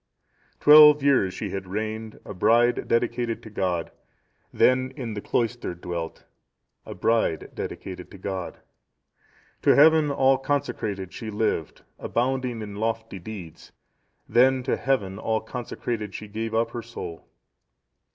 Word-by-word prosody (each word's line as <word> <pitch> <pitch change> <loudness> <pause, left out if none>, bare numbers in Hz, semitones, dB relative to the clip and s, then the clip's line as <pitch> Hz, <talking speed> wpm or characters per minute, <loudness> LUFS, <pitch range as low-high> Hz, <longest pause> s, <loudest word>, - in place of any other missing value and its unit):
"Twelve 150 0 +8
years(671) 135 -9 +3
she - - -5
had 95 -1 -5
reigned, 110 +2 -4
a - - -7
bride 115 +5 +3
dedicated 115 0 0
to 110 - -11
God, 90 -4 -2 0.6
then 130 0 +3
in 120 -6 -5
the 105 - -5
cloister 120 -5 -2
dwelt, 85 -1 -6 0.6
a - - -7
bride 115 -8 0
dedicated 90 -1 -7
to - - -12
God. 95 -1 -5 1.0
"To - - +5
Heaven 155 0 +6
all 135 -1 +3
consecrated 110 -9 -2
she 110 - -6
lived, 105 -6 -2 0.2
abounding 125 -2 -1
in 100 -1 -8
lofty 110 -2 -3
deeds, 90 -4 -10 0.5
then 130 +1 +4
to - - 0
Heaven 105 -7 -1
all 110 0 0
consecrated 110 -3 -5
she 105 - -7
gave 110 +2 -4
up 115 +1 +1
her 120 - -5
soul. 115 -8 -8
110 Hz, 130 wpm, -25 LUFS, 100-125 Hz, 1.0 s, Twelve